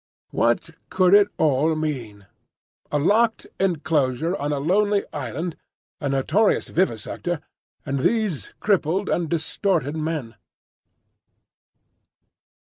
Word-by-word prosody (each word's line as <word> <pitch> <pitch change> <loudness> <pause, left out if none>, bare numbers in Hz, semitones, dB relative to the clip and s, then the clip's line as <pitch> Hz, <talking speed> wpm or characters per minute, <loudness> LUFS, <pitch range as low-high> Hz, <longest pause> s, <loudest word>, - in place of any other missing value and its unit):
What 120 +7 +1 0.2
could 185 0 +3
it 205 0 +7
all 155 +1 +2
mean? 125 -10 -4 0.7
A 150 - +2
locked 220 +9 +2
enclosure 160 -3 +1
on 145 -3 -2
a 145 - 0
lonely 200 +7 +2
island, 170 0 -4 0.4
a 145 - -2
notorious 155 +11 +2
vivisector, 175 - -1 0.5
and 140 -1 -1
these 210 - 0
crippled 190 -1 +1
and 170 -3 0
distorted 165 -1 0
men? 155 -7 -3
160 Hz, 100 wpm, -23 LUFS, 140-190 Hz, 0.7 s, it